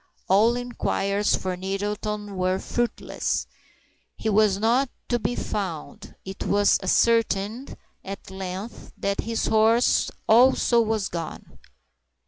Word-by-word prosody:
All 215 Hz, +5 st, +4 dB
inquiries 210 Hz, -4 st, 0 dB
for 185 Hz, -1 st, -3 dB
Nettleton 205 Hz, +2 st, -4 dB
were 185 Hz, 0 st, 0 dB
fruitless; 240 Hz, +4 st, -2 dB, 0.7 s
he 220 Hz, -, -2 dB
was 210 Hz, -2 st, +3 dB
not 240 Hz, +6 st, +2 dB, 0.2 s
to 240 Hz, -, +1 dB
be 245 Hz, -, -2 dB
found. 185 Hz, -7 st, -5 dB
It 190 Hz, 0 st, -8 dB
was 205 Hz, 0 st, +3 dB
ascertained, 225 Hz, +3 st, +1 dB, 0.3 s
at 195 Hz, 0 st, -8 dB
length, 190 Hz, +3 st, -7 dB
that 200 Hz, 0 st, -1 dB
his 230 Hz, 0 st, -2 dB
horse 225 Hz, +2 st, +3 dB, 0.2 s
also 240 Hz, +1 st, +5 dB
was 220 Hz, -3 st, 0 dB
gone. 165 Hz, -2 st, -7 dB
210 Hz, 110 wpm, -25 LUFS, 195-230 Hz, 0.7 s, also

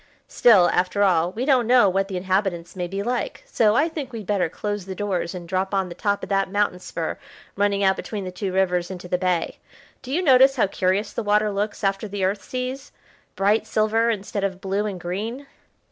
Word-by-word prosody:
"Still, 200 Hz, -7 st, +5 dB
after 185 Hz, +3 st, +1 dB
all, 175 Hz, -3 st, +3 dB
we 235 Hz, +6 st, -3 dB
don't 260 Hz, -5 st, +3 dB
know 245 Hz, -3 st, +6 dB
what 195 Hz, +1 st, +1 dB
the 190 Hz, -2 st, -4 dB
inhabitants 185 Hz, -2 st, -1 dB
may 180 Hz, -1 st, -3 dB
be 195 Hz, +2 st, -4 dB
like, 245 Hz, -, -3 dB
so 225 Hz, -, +2 dB
I 290 Hz, +6 st, +3 dB
think 300 Hz, -5 st, -6 dB
we'd 225 Hz, -4 st, -7 dB
better 185 Hz, -4 st, 0 dB
close 205 Hz, +1 st, -4 dB
the 190 Hz, -, -5 dB
doors, 190 Hz, -4 st, -2 dB
and 175 Hz, -1 st, -8 dB
drop 190 Hz, +2 st, -1 dB
on 190 Hz, -2 st, 0 dB
the -, -, -6 dB
top 200 Hz, +2 st, -1 dB
of -, -, -6 dB
that 195 Hz, -1 st, +1 dB
mountain 205 Hz, -3 st, 0 dB
spur -, -, -5 dB, 0.4 s
running 200 Hz, 0 st, +1 dB
out 190 Hz, 0 st, +3 dB
between 210 Hz, -3 st, -5 dB
the 185 Hz, -, -5 dB
two 185 Hz, +1 st, -4 dB
rivers 180 Hz, -2 st, +1 dB
into 180 Hz, -1 st, -7 dB
the 180 Hz, 0 st, -1 dB
bay. 180 Hz, -3 st, -1 dB, 0.4 s
Do 260 Hz, -, -8 dB
you 345 Hz, +6 st, 0 dB
notice 270 Hz, -2 st, +6 dB
how 240 Hz, -, +3 dB
curious 195 Hz, +2 st, -1 dB
the -, -, -2 dB
water 210 Hz, 0 st, +2 dB
looks 205 Hz, +2 st, -3 dB
after 195 Hz, +2 st, 0 dB
the 200 Hz, -1 st, -4 dB
Earth 200 Hz, +2 st, -1 dB
seas; 255 Hz, +2 st, -5 dB, 0.4 s
bright 205 Hz, +3 st, +2 dB
silver, 220 Hz, +2 st, +2 dB
instead 200 Hz, -2 st, -3 dB
of 190 Hz, -2 st, -2 dB
blue 195 Hz, +2 st, -1 dB
and 195 Hz, -3 st, -5 dB
green?" 215 Hz, +10 st, -4 dB
200 Hz, 215 wpm, -23 LUFS, 185-220 Hz, 0.4 s, know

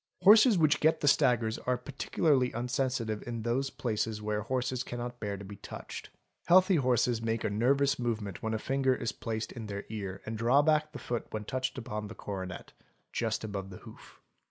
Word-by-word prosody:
Horses 215 Hz, +2 st, +8 dB
which 155 Hz, -3 st, +4 dB
get 160 Hz, +1 st, +3 dB
the 145 Hz, -, +1 dB
staggers 115 Hz, -5 st, +3 dB
are 125 Hz, 0 st, 0 dB
particularly 135 Hz, +1 st, +1 dB
unsensitive 125 Hz, -3 st, -1 dB
in 115 Hz, -2 st, -4 dB
those 130 Hz, +4 st, 0 dB
places 110 Hz, -3 st, -2 dB
where 105 Hz, 0 st, -2 dB
horses 125 Hz, +2 st, -1 dB
cannot 120 Hz, 0 st, -6 dB
bear 100 Hz, -2 st, -3 dB
to 100 Hz, -, -9 dB
be 100 Hz, +1 st, -9 dB
touched. -, -, -8 dB, 0.4 s
Healthy 185 Hz, +1 st, +6 dB
horses 125 Hz, -3 st, +2 dB
make 115 Hz, 0 st, -1 dB
a -, -, 0 dB
nervous 135 Hz, +6 st, +2 dB
movement 110 Hz, -6 st, -3 dB
when 110 Hz, 0 st, -1 dB
a -, -, +1 dB
finger 130 Hz, +3 st, +1 dB
is 115 Hz, -2 st, -2 dB
placed 110 Hz, -1 st, -4 dB
in 115 Hz, -4 st, -7 dB
their 100 Hz, 0 st, -5 dB
ear 100 Hz, -3 st, -5 dB
and 110 Hz, 0 st, -4 dB
draw 125 Hz, +5 st, +4 dB
back 155 Hz, 0 st, +2 dB
the -, -, -7 dB
foot 120 Hz, -1 st, -4 dB
when 110 Hz, -1 st, -4 dB
touched 130 Hz, +3 st, -2 dB
upon 105 Hz, -3 st, -4 dB
the 105 Hz, -, -9 dB
coronet 95 Hz, -3 st, -6 dB, 0.4 s
(just -, -, -1 dB
above 100 Hz, -3 st, -4 dB
the 95 Hz, -, -9 dB
hoof). -, -, -14 dB
120 Hz, 190 wpm, -30 LUFS, 110-130 Hz, 0.4 s, Horses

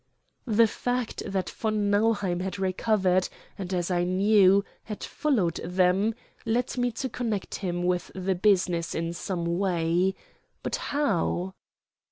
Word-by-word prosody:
The 230 Hz, 0 st, +5 dB
fact 245 Hz, +2 st, -2 dB
that 195 Hz, -2 st, -2 dB
von 215 Hz, -2 st, -1 dB
Nauheim 205 Hz, -4 st, +2 dB
had 190 Hz, +1 st, -3 dB
recovered, 190 Hz, -1 st, +1 dB, 0.3 s
and, 190 Hz, -2 st, -6 dB
as 180 Hz, -1 st, -1 dB
I 175 Hz, -1 st, +2 dB
knew, 195 Hz, +1 st, +4 dB, 0.2 s
had 210 Hz, -2 st, -6 dB
followed 215 Hz, -, 0 dB
them, 185 Hz, +5 st, +2 dB, 0.3 s
led 240 Hz, +2 st, 0 dB
me 245 Hz, -1 st, +1 dB
to 260 Hz, +4 st, -3 dB
connect 225 Hz, -6 st, -3 dB
him 175 Hz, -2 st, -2 dB
with 180 Hz, 0 st, 0 dB
the 190 Hz, 0 st, 0 dB
business 180 Hz, -3 st, +1 dB
in 165 Hz, +1 st, -2 dB
some 170 Hz, 0 st, -2 dB
way, 180 Hz, 0 st, +1 dB, 0.5 s
but -, -, -1 dB
how? 195 Hz, -, -1 dB
190 Hz, 135 wpm, -27 LUFS, 180-215 Hz, 0.5 s, The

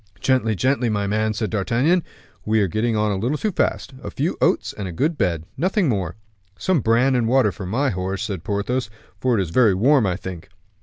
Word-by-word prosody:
"Gently, 115 Hz, -1 st, +1 dB
gently, 130 Hz, +3 st, +1 dB
my 105 Hz, -2 st, 0 dB
man," 110 Hz, +1 st, 0 dB
said 110 Hz, 0 st, -2 dB
D'Artagnan, 125 Hz, -, +2 dB, 0.4 s
"we 110 Hz, +1 st, +2 dB
are 100 Hz, -, +2 dB
getting 110 Hz, +5 st, 0 dB
on 105 Hz, 0 st, +1 dB
a 100 Hz, -, -1 dB
little 125 Hz, +10 st, -1 dB
too 215 Hz, -, -1 dB
fast. 140 Hz, -5 st, -1 dB
A -, -, -6 dB
few -, -, -2 dB
oats -, -, +1 dB
and 100 Hz, -, -5 dB
a -, -, -5 dB
good 150 Hz, -, 0 dB
bed 90 Hz, -, 0 dB
nothing 190 Hz, 0 st, +1 dB
more." 95 Hz, -, -1 dB, 0.4 s
"Some 185 Hz, -, +1 dB
bran 120 Hz, +4 st, +3 dB
and 120 Hz, -3 st, +1 dB
water 125 Hz, -3 st, +3 dB
for 95 Hz, -2 st, -7 dB
my 130 Hz, +8 st, 0 dB
horse," 95 Hz, +1 st, -3 dB
said 95 Hz, -6 st, -4 dB
Porthos, 105 Hz, +5 st, -2 dB, 0.3 s
"for 125 Hz, -3 st, +1 dB
it -, -, +2 dB
is 85 Hz, -, -7 dB
very 110 Hz, -1 st, +4 dB
warm, 125 Hz, +3 st, +4 dB
I 90 Hz, -, 0 dB
think." 90 Hz, -3 st, -8 dB
110 Hz, 215 wpm, -22 LUFS, 100-130 Hz, 0.4 s, very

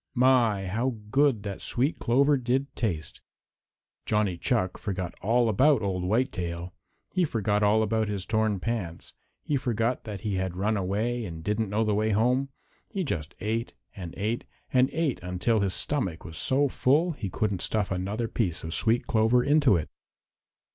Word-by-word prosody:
My, 120 Hz, -6 st, +3 dB
how 115 Hz, +7 st, -1 dB, 0.2 s
good 135 Hz, -5 st, +3 dB
that 100 Hz, -2 st, -5 dB
sweet 135 Hz, +6 st, 0 dB
clover 140 Hz, +4 st, +3 dB
did 130 Hz, +2 st, -1 dB
taste! 85 Hz, -9 st, -3 dB, 0.9 s
Johnny 105 Hz, -4 st, +1 dB
Chuck 95 Hz, 0 st, 0 dB
forgot 95 Hz, -4 st, -3 dB
all 115 Hz, +4 st, +3 dB
about 130 Hz, +3 st, +4 dB
Old 95 Hz, -2 st, -1 dB
Whitetail. 90 Hz, -5 st, -1 dB, 0.4 s
He 185 Hz, -, +2 dB
forgot 105 Hz, -, 0 dB
all 105 Hz, +1 st, +4 dB
about 110 Hz, 0 st, 0 dB
his 100 Hz, -3 st, -3 dB
torn 110 Hz, -3 st, +1 dB
pants. 95 Hz, -6 st, -4 dB, 0.3 s
He 145 Hz, -, 0 dB
forgot 120 Hz, -2 st, -1 dB
that 105 Hz, -4 st, -6 dB
he 100 Hz, -3 st, -2 dB
had 95 Hz, -1 st, -2 dB
run 105 Hz, +3 st, +1 dB
away 105 Hz, +5 st, -1 dB
and 80 Hz, -5 st, -7 dB
didn't 105 Hz, +2 st, -1 dB
know 105 Hz, +3 st, +1 dB
the 105 Hz, -1 st, +1 dB
way 110 Hz, +1 st, +1 dB
home. 125 Hz, +6 st, +2 dB, 0.4 s
He 195 Hz, -, -2 dB
just 80 Hz, -, -4 dB
ate 115 Hz, +3 st, -2 dB, 0.2 s
and 90 Hz, -4 st, -7 dB
ate 110 Hz, +4 st, -1 dB, 0.3 s
and 130 Hz, +1 st, +4 dB
ate 160 Hz, -6 st, -1 dB
until 90 Hz, +6 st, 0 dB
his 100 Hz, -2 st, +1 dB
stomach 95 Hz, -, 0 dB
was 80 Hz, -2 st, -8 dB
so 135 Hz, -, +2 dB
full 150 Hz, +7 st, +2 dB
he 120 Hz, -10 st, -5 dB
couldn't 100 Hz, -1 st, -1 dB
stuff 105 Hz, -3 st, 0 dB
another 100 Hz, +5 st, -2 dB
piece 95 Hz, -8 st, -1 dB
of 80 Hz, 0 st, -5 dB
sweet 115 Hz, +4 st, +1 dB
clover 115 Hz, +2 st, +3 dB
into 145 Hz, -6 st, +4 dB
it. 80 Hz, -3 st, -1 dB
110 Hz, 170 wpm, -27 LUFS, 95-125 Hz, 0.9 s, about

